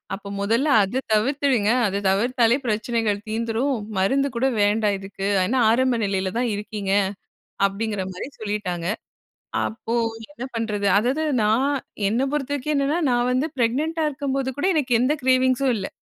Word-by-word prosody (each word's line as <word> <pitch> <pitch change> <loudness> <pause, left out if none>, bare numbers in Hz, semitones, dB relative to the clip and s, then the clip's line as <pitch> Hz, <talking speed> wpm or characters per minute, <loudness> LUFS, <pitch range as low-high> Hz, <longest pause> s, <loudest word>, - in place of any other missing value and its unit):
அப்ப 200 0 -11
மொதல்ல 230 +8 +1 0.2
அத 250 +7 -2
தவிர்த்துடுங்க! 250 -1 +2 0.2
அத 200 +1 -2
தவிர்த்தாலே 235 +4 +2
பிரச்சனைகள் 220 -1 0
தீந்துரும். 230 +4 -1 0.2
மருந்து 270 +9 +2
கூட 260 +3 +2
வேண்டாம் 205 -1 +2
இதுக்கு. 195 0 -5 0.2
ஆனா 245 +8 0
ஆரம்ப 250 0 +2
நிலையில 190 -1 -1
தான் 245 -2 +1
இருக்கீங்க. 205 -1 -3 0.7
அப்பிடிங்கிறமாரி 195 0 -4
சொல்லிட்டாங்க. 195 -5 -3 0.8
அப்போ 225 +1 -5 0.4
என்ன 260 -4 -8
பண்றது 210 -3 -1
அதாவது 260 +8 +1 0.2
நான் 235 +7 +2 0.4
என்ன 235 +4 0
பொறுத்தவரைக்கும் 285 0 -1
என்னென்னா, 280 +4 +1
நான் 245 +1 +2
வந்து 270 +5 +1
ப்ரெக்னன்ட்டா 305 +7 0
இருக்கும்போது 275 -2 -2
கூட 290 - -1
எனக்கு 260 -5 +1
எந்த 270 +4 +3
கிரேவிங்ஸும் 260 0 +3
இல்ல. 195 - -3
235 Hz, 135 wpm, -23 LUFS, 205-265 Hz, 0.8 s, எந்த